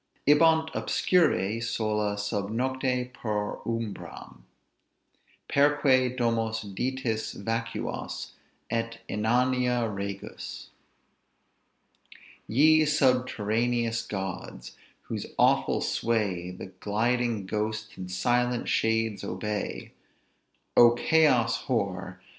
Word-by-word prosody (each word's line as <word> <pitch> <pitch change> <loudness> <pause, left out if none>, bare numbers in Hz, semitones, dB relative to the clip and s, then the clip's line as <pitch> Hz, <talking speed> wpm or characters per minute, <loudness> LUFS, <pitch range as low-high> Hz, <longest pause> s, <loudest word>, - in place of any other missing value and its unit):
Ibant 160 +2 +5
obscuri, 115 - +1
sola 105 -2 -1
sub 105 -1 -2
nocte, 125 +1 -1
per 105 -4 -3
umbram, 110 - -5 1.1
Perque 135 -3 +3
domos 115 -2 0
Ditis 115 +2 -2
vacuas, 115 +2 -4 0.4
et 115 0 -2
inania 125 +2 +1
regus. 100 -1 -6 1.8
"Ye 155 +6 +5
subterraneous 120 -5 +1
gods! 95 - -6 0.3
whose - - -5
awful - - +3
sway 100 -6 -1
The 90 +1 -9
gliding 115 0 0
ghosts, 110 +2 -3
and 90 -1 -7
silent 120 +5 +1
shades 110 -1 +1
obey: 105 +3 -4 0.8
O 120 0 +8
Chaos 120 -5 +3
hoar! 95 -7 -2
115 Hz, 80 wpm, -27 LUFS, 105-125 Hz, 1.8 s, O